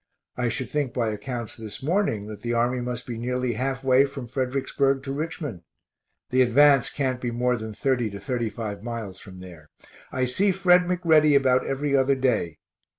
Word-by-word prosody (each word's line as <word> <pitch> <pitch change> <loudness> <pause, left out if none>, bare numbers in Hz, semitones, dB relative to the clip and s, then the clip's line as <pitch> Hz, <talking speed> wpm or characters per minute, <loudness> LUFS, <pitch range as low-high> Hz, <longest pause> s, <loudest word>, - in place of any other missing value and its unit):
I 125 -1 0
should 130 +3 -4
think 145 -5 -1
by 115 -3 +1
accounts 110 +2 -5
this 110 +2 -8
morning 155 - 0
that 105 -1 -9
the 120 0 -2
army 120 +2 +1
must 125 0 -4
be 120 -2 -5
nearly 125 0 -1
half 130 +3 -2
way 130 0 +5
from 135 -3 -7
Fredericksburg 135 +2 0
to 135 - -4
Richmond. 150 - -4 0.7
The 130 +1 +4
advance 135 +2 +5
can't 130 -3 -2
be 120 - -2
more 125 +1 +1
than 110 -2 -6
30 125 -4 0
to 100 0 -8
35 110 -2 -3
miles 110 -5 -6
from 95 -2 -12
there. 85 -5 -12 0.4
I 130 0 0
see 190 +11 +2
Fred 180 -1 +4
McReady 160 -5 +4
about 130 -2 +2
every 140 +1 0
other 135 0 +3
day. 125 - 0
125 Hz, 180 wpm, -25 LUFS, 115-140 Hz, 0.7 s, way